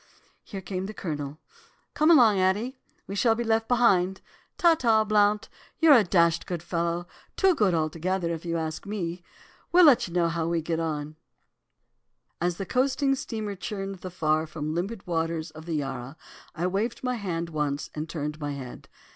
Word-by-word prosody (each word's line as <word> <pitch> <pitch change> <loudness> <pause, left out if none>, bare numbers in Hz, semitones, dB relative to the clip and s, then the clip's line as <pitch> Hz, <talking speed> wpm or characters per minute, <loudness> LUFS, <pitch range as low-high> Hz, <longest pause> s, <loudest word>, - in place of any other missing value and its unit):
"Here 195 -3 -7
came 185 0 -4
the 215 - -8
Colonel. 145 -4 -4 0.6
'Come 305 +2 +3
along, 235 - +6
Addie, 205 +8 +1 0.3
we 195 - -7
shall 225 +3 +3
be 235 - -2
left 225 0 +1
behind. 190 -7 +3 0.4
Ta 340 -1 +6
ta, 225 -8 +3
Blount, 210 0 +2 0.3
you're 320 -3 +7
a 240 -5 +7
dashed 170 -3 +2
good 175 -3 -4
fellow, 170 0 -1 0.3
too 385 -1 +4
good 205 - +2
altogether, 170 +3 -1
if 165 - -6
you 170 -1 -2
ask 160 +3 -4
me. 180 -4 -4 0.5
We'll 355 0 +7
let 280 -9 +6
you 170 - -10
know 170 -1 +3
how 165 -1 -1
we 170 -1 0
get 165 0 -1
on.' 155 -2 -3 1.2
"As 175 0 0
the 195 - -4
coasting 270 +3 +1
steamer 220 -6 -4
churned 195 -1 -5
the 185 - -6
far 155 -2 0
from 155 -1 -4
limpid 190 +5 -3
waters 165 -1 -2
of 155 +1 -12
the 165 - -2
Yarra, 135 0 -4 0.4
I 170 +2 -2
waved 205 +8 -1
my 250 -1 0
hand 170 -5 -3
once 150 -2 -2
and 155 +1 -5
turned 150 -1 -4
my 145 -1 -3
head. 130 -3 -9
180 Hz, 180 wpm, -27 LUFS, 160-215 Hz, 1.2 s, you're